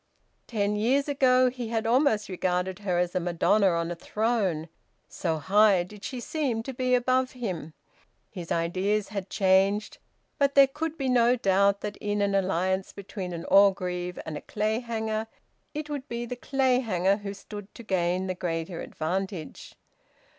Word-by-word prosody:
Ten 210 -2 0
years 255 +7 +2
ago 255 -3 +4
he 245 -2 -5
had 225 0 -1
almost 235 -2 +2
regarded 185 0 -1
her 190 -4 -1
as 175 0 0
a - - +1
madonna 180 +4 +2
on 170 -1 0
a - - -3
throne, 200 -5 -1 0.4
so 165 -3 -2
high 195 +3 +4
did 205 +3 -13
she 255 - -4
seem 245 -4 -2
to 265 - -6
be 255 0 +1
above 255 +1 +1
him. 185 - -5 0.6
His 175 -4 -8
ideas 190 +5 0
had 200 -2 -5
changed, 195 +2 +2 0.4
but 280 -1 +2
there 275 -1 +9
could 305 +4 -4
be 270 - -2
no 245 -1 +4
doubt 200 -2 +2
that 210 -1 -5
in 205 0 -2
an 200 0 +1
alliance 190 0 0
between 195 -2 -6
an 170 -1 -6
Orgreave 180 -3 +3
and 155 - -5
a 145 - -5
Clayhanger, 220 0 -2 0.5
it 300 0 -4
would 290 -1 -5
be 235 0 -3
the 250 - -5
Clayhanger 245 -8 +1
who 200 -1 -6
stood 205 0 -10
to 235 - -10
gain 185 -2 0
the 185 - -2
greater 165 -1 -3
advantage. 180 +1 -4
205 Hz, 160 wpm, -27 LUFS, 185-240 Hz, 0.6 s, there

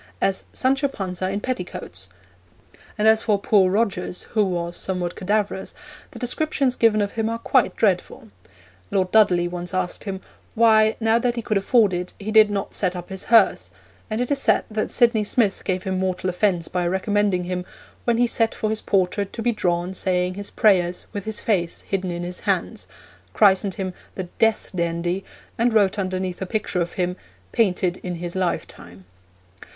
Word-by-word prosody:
as 195 -1 0
'Sancho 270 +2 +1
Panza 185 -6 -4
in 200 +1 -2
petticoats!'; 180 - -5 0.9
and 210 - +2
as 220 0 +5
for 210 -2 +2
poor 200 -1 +3
Rogers, 190 -3 -1
who 215 -2 +3
was 175 -2 -2
somewhat 180 -2 -3
cadaverous, 200 0 -2 0.3
the - - -12
descriptions 270 0 0
given 215 -2 +3
of 200 - -3
him 225 -1 -1
are 230 - -2
quite 250 +2 +2
dreadful. 185 - 0 0.6
Lord 185 -1 0
Dudley 180 -5 +4
once 175 +1 -4
asked 185 +2 -2
him 195 -2 -4 0.4
'why, 220 -1 +5
now 225 0 +3
that 240 0 0
he 235 - -4
could 215 - 0
afford 210 -1 +3
it, 180 0 -3
he 210 +1 -4
did 215 -1 +6
not 200 -1 -3
set 185 -2 0
up 175 -1 -7
his 190 -1 -6
hearse,' 200 - +4 0.4
and 215 +1 -2
it 245 +3 -1
is 280 -1 +2
said - - +3
that 215 0 -1
Sydney 235 -3 +3
Smith 210 -1 +1
gave 185 -1 -1
him 190 -1 -2
mortal 185 0 -1
offence 180 -2 0
by 180 -1 -1
recommending 190 0 +1
him 180 0 -3 0.4
'when 235 -1 +2
he 245 - +4
sat 230 -1 +1
for 215 - -1
his 220 - -2
portrait 195 +1 0
to 225 - -5
be 240 - +2
drawn 180 -4 -1
saying 180 -1 0
his 200 +1 -6
prayers, 180 -4 +2
with 200 -2 -5
his 220 -1 -4
face 175 -6 0
hidden 190 -2 -3
in 175 0 -4
his 180 +1 -4
hands,' - - -2 0.5
christened 195 -2 +4
him 190 -3 -4 0.2
the 185 - -3 0.2
'Death 225 -1 +2
dandy,' 170 +1 -1 0.4
and 235 0 +2
wrote 200 -1 +3
underneath 185 -1 -3
a 190 - -3
picture 200 -3 -1
of 170 0 -3
him, 180 0 -2 0.3
'Painted 185 -4 +1
in 180 -1 -5
his 175 +1 -6
lifetime.' 95 - -4
195 Hz, 180 wpm, -23 LUFS, 180-220 Hz, 0.9 s, did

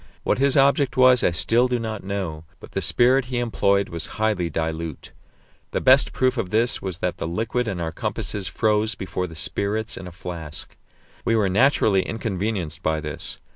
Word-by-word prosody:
What - - +1
his 140 0 +3
object 140 -1 +3
was 130 -1 +6
I - - +5
still 115 +9 +2
do 125 -1 0
not 110 -3 -4
know, 95 -6 -4 0.2
but - - -13
the - - -2
spirit 130 +2 +3
he 125 0 -3
employed 100 -4 +1
was 85 -2 -4
highly 105 -6 +1
dilute. 80 -1 -4 0.6
The - - +1
best 130 +1 +5
proof 130 0 +1
of 95 - -2
this 115 +5 +1
was 95 -3 -4
that 90 - -2
the - - -3
liquid 115 +7 -1
in 95 -4 -3
our 80 -1 -2
compasses 100 +3 -4
froze 105 +3 +1
before 90 0 -3
the 80 - -11
spirits 100 +7 -2
in 95 - -7
a - - -8
flask. 80 -4 -8 0.5
We 115 - +2
were 105 -3 +2
naturally 105 -2 +3
inconvenienced 95 -6 -3
by 80 -2 0
this. 75 -1 -6
100 Hz, 185 wpm, -23 LUFS, 85-120 Hz, 0.6 s, was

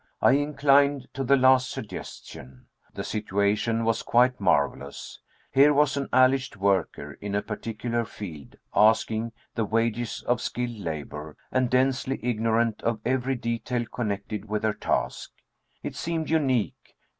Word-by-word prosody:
I - - +5
inclined 140 -1 +3
to 135 - -3
the 140 +2 +4
last 130 0 +5
suggestion. 65 0 -9 0.3
The - - -4
situation 105 +2 0
was 115 0 +1
quite 125 +1 +3
marvelous. 70 -6 -1 0.3
Here 145 +2 +5
was 145 -1 +3
an 140 -1 -3
alleged 130 0 +3
worker, 95 -8 -1
in 100 0 -3
a 100 - 0
particular 115 +2 -3
field, 85 -10 -9 0.2
asking 110 +1 +3 0.2
the 115 - 0
wages 115 +2 -1
of 120 -1 +1
skilled 120 -2 -3
labor, 75 -3 -6
and 130 -1 +1
densely 130 +1 +1
ignorant 115 -1 +1
of 115 -1 -1
every 130 +1 0
detail 120 0 -2
connected 105 -2 -4
with 105 0 -3
her 110 -1 +2
task. - - -2 0.5
It - - -5
seemed 165 -2 -3
unique. 135 -9 0
115 Hz, 135 wpm, -26 LUFS, 105-130 Hz, 0.5 s, I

